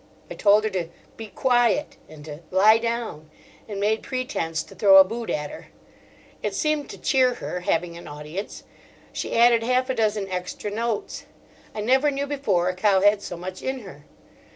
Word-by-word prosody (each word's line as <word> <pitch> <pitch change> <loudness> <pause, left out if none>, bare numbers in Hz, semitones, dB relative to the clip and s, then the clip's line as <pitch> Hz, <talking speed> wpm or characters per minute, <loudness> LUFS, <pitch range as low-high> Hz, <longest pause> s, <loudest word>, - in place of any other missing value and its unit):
I - - -3
told 210 0 +4
her 215 - 0
to 175 -3 -3 0.3
"be 225 - -8
quiet," 245 +4 +1
and 150 -1 -12
to 150 -1 -8
"lie 210 +4 +5
down"; 230 -10 -4 0.4
and 205 -2 -5
made 215 +2 +1
pretence 165 -11 -3
to - - -15
throw 195 -2 +6
a 190 - +10
boot 230 +4 -6
at 150 -1 -2
her. - - -11 0.7
It - - -3
seemed 305 -2 -1
to - - -8
cheer 255 -3 +2
her, 180 - -5
having 170 -1 -1
an 170 - -10
audience; 150 +7 -7 0.5
she - - -3
added 235 0 +5
half 255 +2 +1
a - - 0
dozen 215 -4 0
extra 180 +3 -4
notes. 225 0 -3 0.5
I 210 - -3
never 265 +6 +3
knew 280 0 -2
before 225 -12 0
a 185 - 0
cow 190 0 +3
had 205 +1 +4
so 175 - -7
much 185 +2 -7
in 265 -1 -3
her. 150 -8 -13
210 Hz, 185 wpm, -24 LUFS, 180-240 Hz, 0.7 s, a